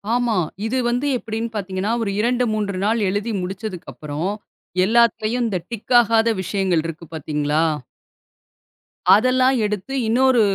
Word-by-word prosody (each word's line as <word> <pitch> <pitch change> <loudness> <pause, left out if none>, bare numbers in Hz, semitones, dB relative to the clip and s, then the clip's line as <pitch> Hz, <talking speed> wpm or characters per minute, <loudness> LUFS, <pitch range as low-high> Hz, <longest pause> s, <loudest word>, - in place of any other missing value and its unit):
ஆமா. 245 -2 +1 0.3
இது 240 +4 -1
வந்து 245 +4 0
எப்படின்னு 225 0 -4
பார்த்தீங்கன்னா, 195 +1 -2
ஒரு 200 - -1
2, 245 +3 +2
3 205 -3 -2
நாள் 225 +2 +2
எழுதி 205 +4 -2
முடிச்சதுக்கு 190 0 -6
அப்புறம், 150 +4 -4 0.6
எல்லாத்தையும் 235 +1 +2
இந்த 190 -5 -1
டிக் 235 +2 -4
ஆகாத 230 0 +2
விஷயங்கள் 185 -4 0
இருக்கு 165 +1 -7
பாத்தீங்களா? 150 0 0 1.5
அதெல்லாம் 255 +4 +3
எடுத்து 210 +4 -3
இன்னொரு 250 +1 +4
215 Hz, 125 wpm, -21 LUFS, 185-235 Hz, 1.5 s, இன்னொரு